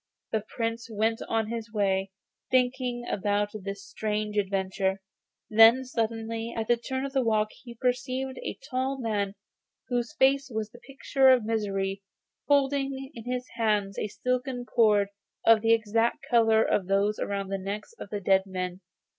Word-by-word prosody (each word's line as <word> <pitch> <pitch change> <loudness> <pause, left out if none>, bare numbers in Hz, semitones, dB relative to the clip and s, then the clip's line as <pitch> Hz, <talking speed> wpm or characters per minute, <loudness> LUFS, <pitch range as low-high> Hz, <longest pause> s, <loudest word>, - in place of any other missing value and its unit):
The 220 - +1
Prince 230 +1 -4
went 220 +1 0
on 225 -1 0
his 230 -1 -5
way, 195 -2 +1 0.4
thinking 250 -1 +1
about 205 +1 0
this 200 -1 -6
strange 210 0 -3
adventure, 195 -1 0 0.5
when 225 +4 +7
suddenly 225 -1 -2
at 220 -1 -2
the 240 - +4
turn 260 +3 -4
of 275 - -6
the 270 - +3
walk 215 -3 +2
he 240 -2 -12
perceived 255 +2 -1
a - - -5
tall 265 0 -1
man 205 -4 -1 0.5
whose 245 +3 -1
face 275 0 +3
was 220 -2 -3
the 240 - -14
picture 270 0 +2
of 250 -4 +5
misery, 195 -3 -1 0.5
holding 275 -1 +1
in 230 -1 -10
his 250 0 -3
hands 210 -4 +1
a - - -1
silken 250 +2 -2
cord 210 -5 +3 0.4
of 225 -1 +6
the 225 0 +3
exact 225 +1 +1
colour 225 -2 +4
of 190 -3 0
those 200 +2 +1
round 200 -1 -2
the 195 - -1
necks 200 - -5
of - - -8
the 205 - -3
dead 190 0 +3
men. 185 -1 -4
225 Hz, 160 wpm, -28 LUFS, 205-250 Hz, 0.5 s, when